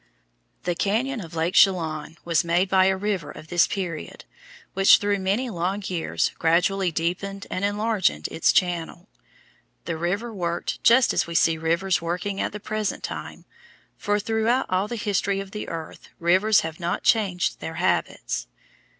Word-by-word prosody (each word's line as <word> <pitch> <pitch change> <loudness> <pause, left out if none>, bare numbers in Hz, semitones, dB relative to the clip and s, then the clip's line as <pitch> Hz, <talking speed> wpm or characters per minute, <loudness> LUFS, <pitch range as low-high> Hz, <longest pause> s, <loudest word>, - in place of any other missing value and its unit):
The 175 - 0
cañon 225 +7 -1
of 165 0 -11
Lake 165 +2 0
Chelan 160 -4 +2
was 170 -1 +2
made 175 +3 +1
by 190 0 +4
a 190 0 +2
river 195 -5 -2
of 155 - -11
this 175 -1 +4
period, 175 -6 -5 0.5
which 195 0 +7
through 205 -1 0
many 200 +7 0
long 185 +3 -2
years 175 -3 -1
gradually 180 +3 +2
deepened 180 +5 -3
and 185 - -3
enlarged 205 0 +2 0.2
its 165 - +2
channel. 175 -3 -1 0.8
The 170 - -3
river 200 +8 -2
worked 175 -3 -3
just 240 +2 +5
as - - +1
we 170 - -6
see 165 -1 +3
rivers 170 +3 +1
working 180 +4 -3
at - - -1
the 210 - -7
present 215 0 -3
time, - - -7 0.5
for 205 0 0
throughout 225 +4 +1
all 185 +2 +1
the 235 - -4
history 200 -3 0
of 195 0 -7
the 210 - -6
earth 165 -1 -8
rivers 190 +5 +4
have 160 0 -6
not 175 0 -2
changed 195 -6 +1
their 160 - -6
habits. 175 +3 -1
185 Hz, 160 wpm, -24 LUFS, 170-205 Hz, 0.8 s, which